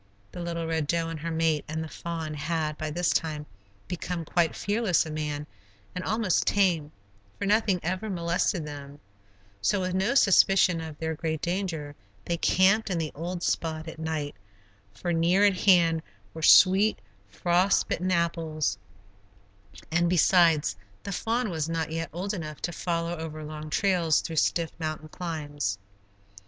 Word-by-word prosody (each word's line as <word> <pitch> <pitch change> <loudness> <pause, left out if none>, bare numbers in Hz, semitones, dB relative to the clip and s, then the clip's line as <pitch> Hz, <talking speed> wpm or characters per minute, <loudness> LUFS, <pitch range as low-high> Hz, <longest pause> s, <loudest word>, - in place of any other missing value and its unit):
The - - -8
little 170 -1 -3
Red 160 -2 -1
Doe 165 +1 0
and 165 -1 -5
her 165 +2 -4
mate, 160 -2 +1
and 160 +1 -3
the - - -6
fawn, 165 -1 -5
had, 155 +1 -2
by 155 0 -4
this 175 +3 0
time, 150 -2 -1 0.4
become 175 -1 -4
quite 170 0 +1
fearless 205 -5 +1
of 155 - -6
man, 150 -1 -3 0.5
and 180 - -4
almost 215 -5 +1
tame, 175 -7 +2 0.5
for - - -3
nothing 205 -2 +2
ever 185 +6 -2
molested 170 -1 0
them; 145 -1 -9 0.6
so, 195 - +1
with 185 0 -2
no 195 +8 +1
suspicion 195 -6 +5
of 160 -2 -7
their 160 +1 -2
great 160 0 -3
danger, 170 -4 -3 0.3
they 170 - 0
camped 195 +6 +3
in 180 - -1
the 160 -2 -2
old 175 +3 -5
spot 160 0 -1
at 160 - -8
night, 155 -2 -3 0.6
for 120 - -3
near 175 +5 +4
at 200 -2 +4
hand 170 -4 +4 0.3
were 160 - -7
sweet, 190 +6 +6 0.3
frost 175 - +2
bitten 185 +1 -1
apples, 165 - 0 1.1
and 175 +1 +2
besides, 170 - +4 0.3
the 200 - -5
fawn 225 +3 -1
was 160 -1 -2
not 165 -1 -2
yet 165 -1 -3
old 190 +5 -3
enough 155 -6 -6
to 175 - -1
follow 170 0 -2
over 155 -1 -6
long 155 0 -7
trails 170 -3 +2
through 165 -2 -6
stiff 165 +1 +1
mountain 155 -1 -4
climbs. 145 - -3
165 Hz, 160 wpm, -27 LUFS, 155-180 Hz, 1.1 s, sweet